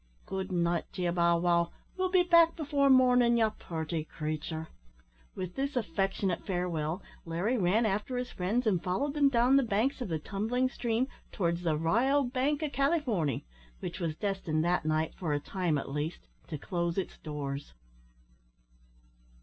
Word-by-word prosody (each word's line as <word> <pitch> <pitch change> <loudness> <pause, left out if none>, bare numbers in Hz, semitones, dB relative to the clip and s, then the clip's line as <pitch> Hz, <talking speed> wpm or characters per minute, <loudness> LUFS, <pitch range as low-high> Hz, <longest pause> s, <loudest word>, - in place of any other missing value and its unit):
Good 190 0 -4
night 170 -1 +1
to 180 - -3
ye, 175 - +2
Bow 170 -1 +3
wow, 170 0 +2 0.2
we'll 370 0 0
be 365 -1 +4
back 335 -1 +5
before 285 -3 +1
mornin', 250 -2 +5
ye 225 -1 +4
purty 160 -1 -3
creature." 155 +1 -4 0.7
With 185 -1 -4
this 275 +4 -2
affectionate 195 -3 -1
farewell, 175 -2 -2 0.2
Larry 175 +9 -1
ran 200 +5 +3
after 215 +5 -1
his 250 0 -3
friends 210 +8 -1
and 190 -6 +2
followed 275 +11 -1
them 290 -2 +4
down 250 +1 +4
the - - +5
banks 240 +4 0
of 245 - -2
the 160 - 0
tumbling 220 +10 -1
stream 240 0 0 0.2
towards 170 -3 0
the 160 -3 +1
`R'yal 245 - +2
Bank 285 +4 +1
o' 305 - 0
Calyforny,' 265 - +1 0.4
which - - -5
was 165 -3 -2
destined 180 -5 -1
that 175 -2 +1
night, 155 0 0
for 160 -5 -2
a 145 - +1
time 175 -1 -1
at 135 - -4
least, 150 +4 -4 0.2
to 155 - -4
close 170 +2 -2
its 190 - -3
doors. 145 - -5
190 Hz, 165 wpm, -30 LUFS, 165-250 Hz, 0.7 s, back